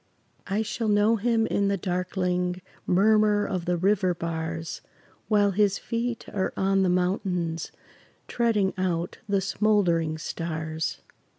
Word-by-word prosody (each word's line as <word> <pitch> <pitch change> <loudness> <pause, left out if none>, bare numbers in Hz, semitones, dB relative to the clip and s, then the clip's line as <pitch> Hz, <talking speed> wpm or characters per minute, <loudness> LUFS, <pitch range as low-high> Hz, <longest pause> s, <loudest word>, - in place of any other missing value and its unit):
I 205 +3 0
shall 225 +1 -3
know 210 +2 +4
him 225 +1 +2
in 200 -2 +1
the 200 0 +1
darkling 180 0 -1 0.2
Murmur 210 +2 +4
of 180 -4 -3
the 180 0 +1
river 185 0 +2
bars, 165 0 -4 0.5
While 205 -2 +3
his 200 0 +2
feet 235 0 -3
are 190 -2 0
on 195 0 +2
the 185 - +3
mountains 180 -2 -1 0.6
Treading 220 -5 +1
out 175 -2 -1
the 200 -1 +2
smoldering 180 -6 +1
stars. 160 -1 -4
190 Hz, 125 wpm, -26 LUFS, 175-210 Hz, 0.6 s, know